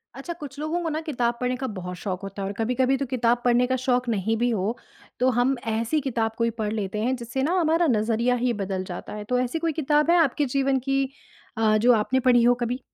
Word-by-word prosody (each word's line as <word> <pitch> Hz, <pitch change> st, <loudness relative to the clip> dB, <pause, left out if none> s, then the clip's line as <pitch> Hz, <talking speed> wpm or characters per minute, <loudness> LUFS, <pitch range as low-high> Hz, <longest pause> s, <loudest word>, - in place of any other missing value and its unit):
अच्छा, 310 Hz, +6 st, -6 dB
कुछ 290 Hz, -4 st, -10 dB
लोगों 315 Hz, +3 st, -2 dB
को 330 Hz, -, -1 dB
ना 310 Hz, 0 st, -2 dB
किताब 245 Hz, -7 st, -1 dB
पढ़ने 250 Hz, 0 st, 0 dB
का 265 Hz, -, -1 dB
बहुत 180 Hz, 0 st, -5 dB
शौक 185 Hz, -2 st, -4 dB
होता 195 Hz, 0 st, -6 dB
है -, -, -2 dB
और 200 Hz, -, -4 dB
कभी-कभी 250 Hz, +3 st, +1 dB
तो 275 Hz, -, -2 dB
किताब 240 Hz, -1 st, +1 dB
पढ़ने 245 Hz, 0 st, +4 dB
का 260 Hz, -, +1 dB
शौक 250 Hz, -1 st, +1 dB
नहीं 220 Hz, 0 st, 0 dB
भी 240 Hz, +2 st, +1 dB
हो, 220 Hz, 0 st, -1 dB, 0.4 s
तो 255 Hz, +1 st, +3 dB
हम 265 Hz, +2 st, +3 dB
ऐसी 230 Hz, +7 st, 0 dB
किताब 230 Hz, -5 st, -1 dB
कोई 230 Hz, 0 st, +1 dB
पढ़ 210 Hz, -1 st, -1 dB
लेते 210 Hz, -1 st, -3 dB
हैं 255 Hz, +3 st, +1 dB
जिससे 245 Hz, +2 st, -4 dB
ना 320 Hz, +6 st, +1 dB
हमारा 330 Hz, 0 st, +2 dB
नज़रिया 230 Hz, +2 st, +1 dB
ही 245 Hz, 0 st, 0 dB
बदल 190 Hz, -1 st, -3 dB
जाता 180 Hz, -1 st, -7 dB
है। 210 Hz, 0 st, -6 dB
तो 250 Hz, +4 st, 0 dB
ऐसी 250 Hz, +6 st, -1 dB
कोई 330 Hz, 0 st, 0 dB
किताब 300 Hz, +2 st, +2 dB
है 350 Hz, -, +5 dB
आपके 295 Hz, -3 st, +2 dB
जीवन 270 Hz, -1 st, +2 dB
की 270 Hz, +1 st, 0 dB, 0.5 s
अ, 215 Hz, -1 st, +3 dB
जो 240 Hz, +4 st, +4 dB
आपने 230 Hz, +4 st, +1 dB
पढ़ी 250 Hz, -2 st, +4 dB
हो 240 Hz, +1 st, +6 dB
कभी? 245 Hz, +2 st, -2 dB
245 Hz, 240 wpm, -25 LUFS, 225-270 Hz, 0.5 s, हो